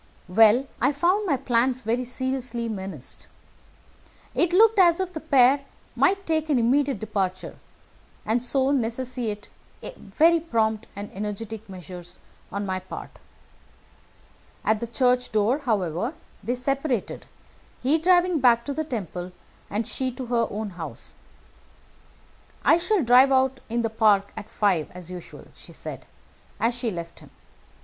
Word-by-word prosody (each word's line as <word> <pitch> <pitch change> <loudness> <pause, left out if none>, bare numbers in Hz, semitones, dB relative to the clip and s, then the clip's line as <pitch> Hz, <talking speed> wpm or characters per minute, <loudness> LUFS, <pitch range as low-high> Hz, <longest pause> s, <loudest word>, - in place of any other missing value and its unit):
"Well, 220 +7 +5 0.2
I 290 - +3
found 365 +8 +1
my 285 -6 +2
plans 255 0 +1
very 235 +3 -1
seriously 250 -2 -3
menaced. 190 - -5 1.1
It 345 0 +1
looked 435 +3 +5
as 345 -2 +5
if 370 -1 -2
the 315 - -4
pair 275 -2 +4 0.3
might 390 0 +2
take 315 -1 0
an 285 - +3
immediate 265 +2 +2
departure, 195 -3 -3 0.7
and 225 +3 +1
so 265 +2 +1
necessitate 240 -4 -2 0.5
very 335 +1 +3
prompt 225 -8 -1
and 205 +1 -7
energetic 210 +2 -6
measures 180 -1 -9 0.3
on 200 0 -3
my 185 -1 -2
part. 185 - -9 1.5
At 215 0 +2
the 235 - -4
church 250 +1 +1
door, 220 +6 +2
however, 220 - -1 0.3
they 245 - -1
separated, 270 -2 -2 0.6
he 290 +5 +3
driving 355 0 +3
back 235 -2 +4
to 285 - -3
the 315 - -2
Temple, 185 - -5 0.4
and 215 +3 -2
she 260 +1 -2
to 255 +1 -6
her 235 -1 +1
own 210 0 -4
house. 160 -9 -8 1.5
'I - - +6
shall 360 +1 +1
drive 255 +3 +6
out 265 0 +2
in 235 +1 -1
the 225 - -1
park 210 -3 +3
at 220 0 -8
five 190 -7 +1
as 180 -1 -9
usual,' 180 -2 -10
she - - -14
said, - - -7 0.5
as 230 +2 +2
she 240 -1 -2
left 170 -4 -7
him. - - -16
240 Hz, 140 wpm, -25 LUFS, 210-275 Hz, 1.5 s, I